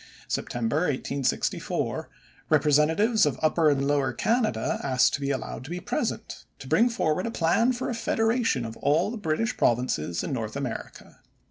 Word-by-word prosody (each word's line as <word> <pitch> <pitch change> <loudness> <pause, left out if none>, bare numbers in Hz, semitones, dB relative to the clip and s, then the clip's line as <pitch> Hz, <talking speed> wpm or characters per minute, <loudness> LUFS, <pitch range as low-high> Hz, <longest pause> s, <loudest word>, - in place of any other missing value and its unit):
September 120 +3 -2
1864, 140 -4 -1 0.4
representatives 160 - +3
of 145 - -1
Upper 155 0 +4
and 140 -1 +1
Lower 140 -3 +1
Canada 220 - 0
asked 130 -2 +3
to 140 - -2
be 140 - -1
allowed 135 -2 -3
to - - -9
be 175 +1 -4
present - - -3
to 135 - -11
bring 235 - +4
forward 185 -5 0
a - - -1
plan 225 +5 +2
for 250 0 -3
a - - -2
Federation 225 - 0
of 115 0 -6
all 155 +8 +1
the 235 - -5
British 205 +5 -1
Provinces 100 -9 0
in - - -3
North 110 -3 -4
America. 140 -4 -6
150 Hz, 160 wpm, -26 LUFS, 130-220 Hz, 0.4 s, Upper